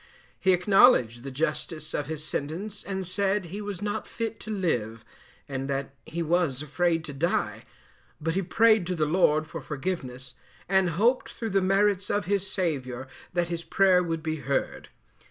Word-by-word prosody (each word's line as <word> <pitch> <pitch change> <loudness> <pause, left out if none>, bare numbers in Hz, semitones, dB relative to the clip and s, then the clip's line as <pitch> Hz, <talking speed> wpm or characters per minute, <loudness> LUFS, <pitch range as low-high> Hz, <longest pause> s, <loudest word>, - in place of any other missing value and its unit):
He 190 - +4
acknowledged 180 - +5
the 135 - -5
justice 155 +2 -3
of 145 - -2
his 155 -1 -4
sentence, 170 +8 -4
and 190 -1 -3
said 195 +1 0
he 195 +5 -6
was 205 -2 -5
not 205 0 -2
fit 225 -1 -4
to 220 - -9
live, 120 - -1 0.4
and 135 0 -4
that 135 0 -2
he 170 +1 -3
was 160 -5 +1
afraid 165 +2 0
to 145 - -6
die, 120 - -1 0.5
but 165 +1 -1
he 195 - +1
prayed 215 0 +4
to 180 - -1
the 155 -2 +1
Lord 155 -1 +3
for 165 0 -7
forgiveness, 135 -4 -4 0.3
and 190 -1 +3
hoped 240 +6 +3
through 225 -2 -4
the 195 0 +3
merits 195 +1 +2
of 205 -3 0
his 200 +1 0
Saviour 130 -9 -2 0.3
that 175 -1 0
his 170 -1 -3
prayer 190 -1 +4
would 165 -2 -2
be 160 -1 -1
heard. 140 -1 -2
170 Hz, 170 wpm, -27 LUFS, 145-195 Hz, 0.5 s, acknowledged